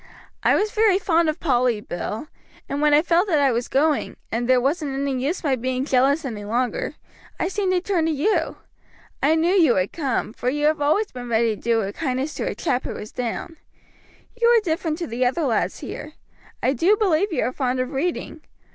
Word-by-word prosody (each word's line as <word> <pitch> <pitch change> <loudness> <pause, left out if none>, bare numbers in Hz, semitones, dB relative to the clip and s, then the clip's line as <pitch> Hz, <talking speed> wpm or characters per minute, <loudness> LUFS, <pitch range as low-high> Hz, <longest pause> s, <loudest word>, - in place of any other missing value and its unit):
I - - +4
was 420 0 +1
very 430 -3 +3
fond 335 -4 +2
of 310 +2 -3
Polly, 245 -7 +2
Bill, 210 - -5 0.4
and 280 +1 -3
when 300 0 +4
I 295 +1 +5
felt 350 +3 +2
that 330 -6 +2
I 280 -2 +3
was 235 +1 -1
going, 295 +1 +1
and 235 +2 -2
there 255 -1 +5
wasn't 275 +1 -1
any 270 -2 -1
use 320 +7 -2
my 280 -4 +2
being 255 +1 -2
jealous 275 +3 +2
any 220 -5 -5
longer, 250 - -2 0.4
I - - 0
seemed 385 0 -1
to 360 - +1
turn 350 -4 0
to - - +1
you. 325 +3 0 0.7
I 300 +4 +4
knew 335 +3 +2
you 325 -11 +4
would 185 +1 0
come, 270 -8 -2
for 245 - -2
you 295 +3 -1
have 310 0 +2
been 290 - +1
always 405 +8 +1
ready 235 -3 0
to - - -15
do 230 -1 +2
a 200 0 -4
kindness 265 +3 -2
to - - -3
a - - -2
chap 255 -6 -1
who - - -5
was 210 - -8
down. 250 +7 -4 0.8
You 470 0 +2
are 475 -1 +5
different 325 -3 -2
to 345 - -3
the 240 0 -2
other 260 +7 +1
lads 235 -6 0
here. 305 - -7 0.5
I 260 - +3
do 360 - +3
believe 390 -1 +2
you 325 - 0
are 255 - -1
fond 255 -2 -1
of 255 +2 -2
reading. 315 +2 -3
290 Hz, 220 wpm, -23 LUFS, 250-335 Hz, 0.8 s, I